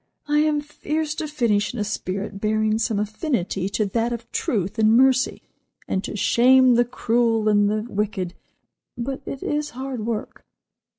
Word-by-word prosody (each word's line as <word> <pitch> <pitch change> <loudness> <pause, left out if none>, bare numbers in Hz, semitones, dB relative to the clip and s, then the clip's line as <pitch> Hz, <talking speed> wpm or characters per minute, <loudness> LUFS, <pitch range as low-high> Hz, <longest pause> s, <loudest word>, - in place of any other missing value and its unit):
I 295 0 +3
am 300 -1 +2
fierce 300 +1 -3
to 315 0 -4
finish 235 -6 0
in - - -4
a - - +1
spirit 200 -1 -4
bearing 215 0 +1
some 225 -2 0
affinity 210 - -2
to 210 +1 0
that 230 +4 -1
of 235 -1 -6
truth 205 0 -1
and 220 +1 +5
mercy, 260 0 +3 0.4
and 190 - -1
to - - -5
shame 255 +4 +5
the 240 +1 +4
cruel 230 -2 +1
and 205 -1 +4
the 215 0 -1
wicked, 200 -5 -2 0.6
but 265 +3 -4
it 275 - -5
is 295 0 -1
hard 260 -4 -4
work." 225 -2 -4
230 Hz, 165 wpm, -23 LUFS, 210-260 Hz, 0.6 s, and